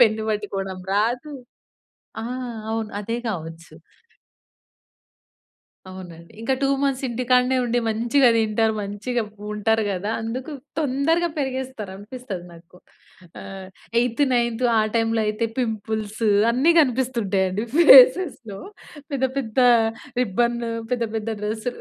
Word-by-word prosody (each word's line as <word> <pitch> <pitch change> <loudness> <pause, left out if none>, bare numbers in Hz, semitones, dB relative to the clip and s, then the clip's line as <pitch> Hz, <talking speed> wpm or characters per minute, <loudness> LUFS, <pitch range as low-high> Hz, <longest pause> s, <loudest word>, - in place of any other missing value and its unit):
Pen 220 -2 +4
వట్టుకోవడం 195 -3 -4
రాదు. 245 +8 0 0.9
ఆ! - - -4 0.5
అవును. 225 -1 -2
అదే 230 +3 -3
గావచ్చు. 165 -4 -7 2.2
అవునండి. 175 -3 -11
ఇంకా 230 +4 0
2 275 - +3
మంత్స్ 275 -1 0
ఇంటికాడనే 250 +2 +2
ఉండి 245 0 0
మంచిగా 240 +4 +3
దింటారు 220 0 +1
మంచిగా 215 +5 -3 0.3
ఉంటారు 220 +1 +1
గదా! 195 +3 -3
అందుకు 250 +6 -5 0.3
తొందరగా 315 +4 +1
పెరిగేస్తారు 260 -6 -4
అనిపిస్తది 205 -3 -8
నాకు. 170 +1 -17 0.6
ఆహ్, 190 -1 -9 0.3
ఎయిత్ 245 +3 +1
నైన్త్ 235 0 0
ఆ - - +5 0.2
టైంలో 225 0 +1
అయితే 215 +2 -1
పింపుల్స్ 220 -2 -3 0.3
అన్ని 260 +8 +3
గనిపిస్తుంటాయండి 225 -7 0
ఫేసెస్‌లో. 265 - +6 0.5
పెద్ద 270 -2 -1
పెద్ద 240 -4 -3 0.6
రిబ్బన్ 235 +2 +1 0.3
పెద్ద 240 -2 0
పెద్ద 220 0 -3
డ్రెస్ 215 +2 -4
225 Hz, 105 wpm, -23 LUFS, 205-255 Hz, 2.2 s, ఫేసెస్‌లో